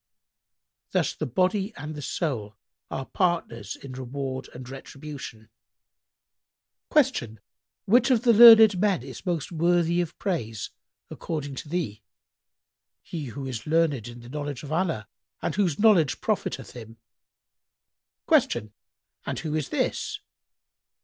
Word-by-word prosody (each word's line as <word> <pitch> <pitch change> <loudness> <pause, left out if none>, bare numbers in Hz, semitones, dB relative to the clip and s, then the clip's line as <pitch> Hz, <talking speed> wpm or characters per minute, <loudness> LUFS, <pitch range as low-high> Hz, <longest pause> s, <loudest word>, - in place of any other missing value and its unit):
Thus - - +1
the - - -4
body 190 - 0
and 155 +1 -6
the 150 - -7
soul 120 - -3 0.3
are 135 - -4
partners 130 - -1
in 135 - -10
reward 130 +1 -5
and 125 0 -10
retribution." 135 -4 -9 1.4
Q 245 - +2 0.5
"Which 240 +5 +4
of 245 -3 +3
the 240 -2 +5
learned 220 -3 +9
men 200 -2 +2
is - - -10
most 170 -3 -1
worthy 170 +1 +2
of 170 -2 -5
praise, 115 - -3 0.4
according 145 -4 -4
to 145 - -7
thee?"—"He 150 - -8
who 135 +2 -6
is 125 -2 -5
learned 150 -7 +1
in 120 0 -10
the 120 - -12
knowledge 145 -1 -5
of 145 - -8
Allah 160 - -1 0.3
and - - -2
whose 180 -7 +1
knowledge 190 - +4
profiteth - - -2
him." 115 -1 -11 1.3
Q 105 0 +2 0.6
"And - - -2
who 155 -2 -4
is 155 -3 -1
this?" - - -1
150 Hz, 125 wpm, -26 LUFS, 125-180 Hz, 1.4 s, learned